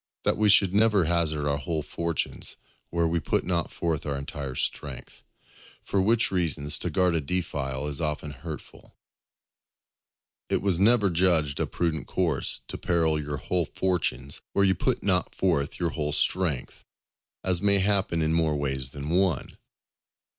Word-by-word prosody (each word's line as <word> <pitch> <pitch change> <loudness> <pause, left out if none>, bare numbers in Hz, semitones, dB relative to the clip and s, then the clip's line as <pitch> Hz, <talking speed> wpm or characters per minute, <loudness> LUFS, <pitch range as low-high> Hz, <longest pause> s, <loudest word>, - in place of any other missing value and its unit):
—_That - - +3
we 105 -1 +3
should 95 -2 +5
never 105 -3 +4
hazard 80 -3 +1
our 70 0 0
whole 80 +2 -2
Fortunes 85 +1 -4 0.3
where 85 -1 +1
we 85 +1 0
put 75 - 0
not 85 -2 -1
forth 80 -4 -2
our 70 -1 -1
entire 70 -1 -5
Strength; - - -4 0.6
for 100 - 0
which 115 +4 +2
reason 85 -6 -1
to 75 +4 0
guard 90 +2 +2
a 80 - +1
Defile 70 -4 -2
is 75 +1 -4
often 75 -1 -2
hurtful_. 75 +4 -10 1.6
It - - 0
was 95 -4 +1
never 105 -1 +4
judged 80 -5 +3
a - - 0
prudent 85 -2 -2
course 85 -7 0
to - - -6
peril 80 -3 +1
your 75 0 -4
whole 90 +5 -1
fortunes 75 -8 -2
where 100 - +3
you 95 - +4
put - - -1
not 90 -2 +1
forth 80 -7 0
your 85 -3 0
whole 75 +1 -2
strength; 80 -6 0 0.6
as 90 -2 +3
may 100 -1 +4
happen 95 -4 +1
in 80 +1 +1
more 80 -2 +2
ways 65 -3 -1
than 70 +2 -6
one. 90 0 +1
85 Hz, 160 wpm, -26 LUFS, 75-90 Hz, 1.6 s, should